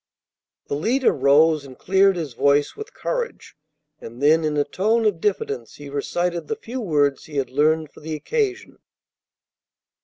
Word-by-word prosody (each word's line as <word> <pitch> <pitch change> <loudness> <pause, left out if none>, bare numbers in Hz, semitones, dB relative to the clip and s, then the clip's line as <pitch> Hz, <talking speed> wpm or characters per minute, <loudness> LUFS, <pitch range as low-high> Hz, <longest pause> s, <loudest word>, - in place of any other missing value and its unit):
The - - -5
leader 235 - +2
rose, 145 +3 +4
and 130 -2 -12
cleared 195 +1 +3
his 155 -7 -4
voice 140 +4 +2
with 430 0 -8
courage; 485 -1 -4 0.4
and 120 +2 -10
then 155 +3 +4
in 150 -1 -1
a 145 - +3
tone 220 +9 0
of 195 -6 +1
diffidence 140 - -2
he 145 -1 -10
recited 170 +3 -2
the - - -2
few 245 +4 -6
words 145 -8 +1
he 150 -2 -7
had 135 -2 -1
learned 155 +2 +1
for - - -15
the 155 +1 -5
occasion. 405 - -2
155 Hz, 160 wpm, -22 LUFS, 145-205 Hz, 0.4 s, rose